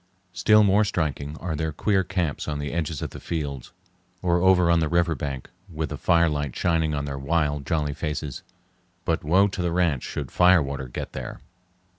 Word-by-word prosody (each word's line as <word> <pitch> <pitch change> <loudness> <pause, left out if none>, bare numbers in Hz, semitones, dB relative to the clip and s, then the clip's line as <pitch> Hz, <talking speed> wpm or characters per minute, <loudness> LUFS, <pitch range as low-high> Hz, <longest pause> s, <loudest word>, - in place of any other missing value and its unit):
Still 105 +4 +5
more 100 +1 +4
striking 75 -6 -2
are 85 -2 -3
their 80 +1 -2
queer 95 +5 +1
camps 90 -5 -2
on 75 -1 -2
the 75 0 -4
edges 80 -3 -2
of - - -4
the - - -9
fields 70 -6 -4 0.5
or 85 -1 +2
over 90 -2 +5
on 85 - +4
the 80 -2 0
river 85 0 +2
bank, 70 -4 -5 0.2
with 80 -2 -3
the - - -4
firelight 75 -5 +2
shining 80 -3 +1
on 70 0 -2
their 70 -1 -4
wild 75 -1 0
jolly 75 -4 0
faces. 75 -2 -4 0.6
But - - 0
woe 95 +7 +4
to 95 - -4
the 85 -1 0
ranch 85 -7 +1
should - - -5
fire 90 -2 +5
water 70 -1 -5
get - - -6
there! - - -6
80 Hz, 190 wpm, -25 LUFS, 75-90 Hz, 0.6 s, Still